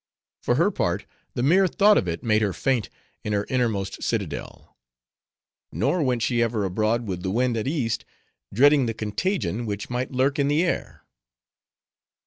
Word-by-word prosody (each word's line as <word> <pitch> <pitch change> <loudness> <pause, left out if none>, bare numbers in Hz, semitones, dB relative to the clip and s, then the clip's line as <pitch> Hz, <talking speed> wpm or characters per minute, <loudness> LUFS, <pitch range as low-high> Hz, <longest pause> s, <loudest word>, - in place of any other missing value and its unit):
For - - +1
her - - +3
part, - - -1 0.3
the 120 - -1
mere 185 +7 +4
thought 205 +3 +4
of 90 - +1
it 85 0 -3
made 110 -2 +2
her 100 -3 0
faint 130 -1 0 0.3
in 105 - -2
her 100 0 0
innermost 110 -7 -1
citadel; - - -4 1.0
nor 110 - 0
went 125 -5 0
she 120 -2 +1
ever 115 -3 0
abroad 110 +5 0
with 90 -4 -4
the 95 - -2
wind 120 +4 +1
at 110 +2 -2
East, 120 -7 -1 0.5
dreading 140 +3 +4
the 115 - -3
contagion 115 - -2
which 100 +2 -4
might 125 +1 -2
lurk 135 +2 +1
in 140 - +2
the 150 +4 +2
air. 175 - -3
120 Hz, 165 wpm, -24 LUFS, 105-135 Hz, 1.0 s, mere